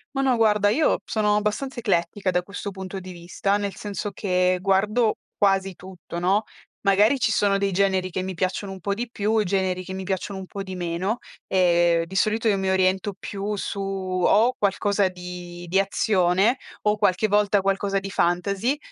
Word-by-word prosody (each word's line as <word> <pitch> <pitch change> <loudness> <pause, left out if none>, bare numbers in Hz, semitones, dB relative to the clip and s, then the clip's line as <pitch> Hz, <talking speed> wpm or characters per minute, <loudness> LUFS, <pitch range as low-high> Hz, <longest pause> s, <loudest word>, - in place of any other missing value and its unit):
Ma 270 - +1
no 260 -3 +2
guarda, 210 -2 +3
io 300 +9 +2
sono 210 -1 +1
abbastanza 210 +5 -2
eclettica, 195 -1 0
da 180 - +1
questo 200 +2 -6
punto 190 0 -7
di 185 - -9
vista, 180 +3 -1
nel 200 -1 -3
senso 205 0 -5
che 180 -2 +1
guardo 210 +4 +2 0.2
quasi 195 -2 +2
tutto, 180 -1 -9
no, 195 +5 +2 0.4
magari 210 +7 +4
ci 220 -2 +2
sono 200 -1 +2
dei 195 -1 0
generi 190 -1 +1
che 185 - -2
mi 185 0 -4
piacciono 185 +3 -2
un 190 - -8
po' 200 +3 -1
di 235 +3 -4
più, 215 0 +1
generi 185 -1 -1
che 190 - -9
mi 190 0 -5
piacciono 190 +1 -3
un 190 - -7
po' 195 +1 -6
di 190 -1 -7
meno. 175 +6 -2 0.3
E 175 -2 +3
di 190 - -9
solito, 215 +4 +1
io 205 -2 +3
mi 190 0 -1
oriento 190 +1 +1
più 205 +1 -4
su, 200 0 -4
o 195 +5 +1
qualcosa 200 -1 +1
di 180 -1 -8
di 190 +3 +2
azione 195 +3 +2 0.2
o 210 0 +2
qualche 205 +2 +2
volta 205 0 +3
qualcosa 195 0 0
di 195 0 -6
fantasy, 195 +10 0
195 Hz, 185 wpm, -24 LUFS, 185-210 Hz, 0.4 s, magari